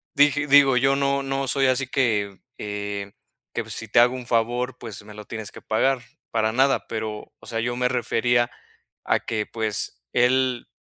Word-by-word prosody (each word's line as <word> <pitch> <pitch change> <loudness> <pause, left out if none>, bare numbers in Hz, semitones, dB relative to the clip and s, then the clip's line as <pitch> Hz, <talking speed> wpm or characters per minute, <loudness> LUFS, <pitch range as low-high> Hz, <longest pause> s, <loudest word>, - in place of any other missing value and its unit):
dije 145 +1 +4
digo, 140 -2 +6
yo 135 +2 +3
no, 140 0 +1
no 135 0 -2
soy 135 0 +2
así 130 0 +1
que, 105 -8 0 0.2
eh, 100 -1 -5 0.4
que - - -3
si 110 - -5
te 120 - +4
hago 125 +2 +5
un 125 -2 -7
favor, 120 +2 0
pues, 110 -3 -8
me 105 0 -12
lo 105 0 -10
tienes 110 -1 -7
que - - -12
pagar, 130 +4 +1 0.3
para 110 -1 +1
nada, 135 +4 +2
pero, 110 -1 -5
o - - -16
sea, 115 - -2
yo 120 +1 -1
me 125 0 +1
refería 120 -1 +1 0.6
a - - +2
que 105 -2 -3
pues, 110 - -2
él 125 0 +2
120 Hz, 185 wpm, -24 LUFS, 110-130 Hz, 0.6 s, digo